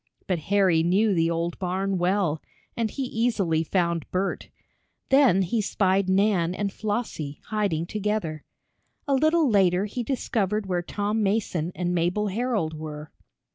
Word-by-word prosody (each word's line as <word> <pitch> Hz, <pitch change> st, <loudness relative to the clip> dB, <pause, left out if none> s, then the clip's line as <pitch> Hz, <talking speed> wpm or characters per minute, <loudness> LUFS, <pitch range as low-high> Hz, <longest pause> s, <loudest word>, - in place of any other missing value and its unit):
But 180 Hz, -3 st, -1 dB
Harry 190 Hz, -5 st, +4 dB
knew 195 Hz, +5 st, +3 dB
the 165 Hz, -2 st, +2 dB
old 170 Hz, +1 st, -2 dB
barn 190 Hz, +1 st, -1 dB
well, 175 Hz, -4 st, +1 dB, 0.3 s
and 230 Hz, -2 st, 0 dB
he 275 Hz, -, -4 dB
easily 220 Hz, -10 st, 0 dB
found 170 Hz, -1 st, -1 dB
Bert. 190 Hz, +2 st, -2 dB, 0.6 s
Then 265 Hz, -9 st, +5 dB
he 215 Hz, +5 st, 0 dB
spied 195 Hz, -1 st, +1 dB
Nan 190 Hz, -3 st, +2 dB
and 200 Hz, -1 st, -2 dB
Flossie, 205 Hz, -9 st, -3 dB
hiding 200 Hz, -7 st, 0 dB
together. 205 Hz, -6 st, -2 dB, 0.6 s
A 280 Hz, -, +2 dB
little 310 Hz, +3 st, +3 dB
later 195 Hz, -4 st, +3 dB
he 215 Hz, +4 st, -4 dB
discovered 215 Hz, -5 st, -1 dB
where 180 Hz, -2 st, -1 dB
Tom 205 Hz, +4 st, -2 dB
Mason 195 Hz, -5 st, 0 dB
and 180 Hz, 0 st, -1 dB
Mabel 180 Hz, +5 st, 0 dB
Herold 215 Hz, -6 st, -1 dB
were. 155 Hz, -1 st, -7 dB
195 Hz, 140 wpm, -25 LUFS, 170-215 Hz, 0.6 s, Then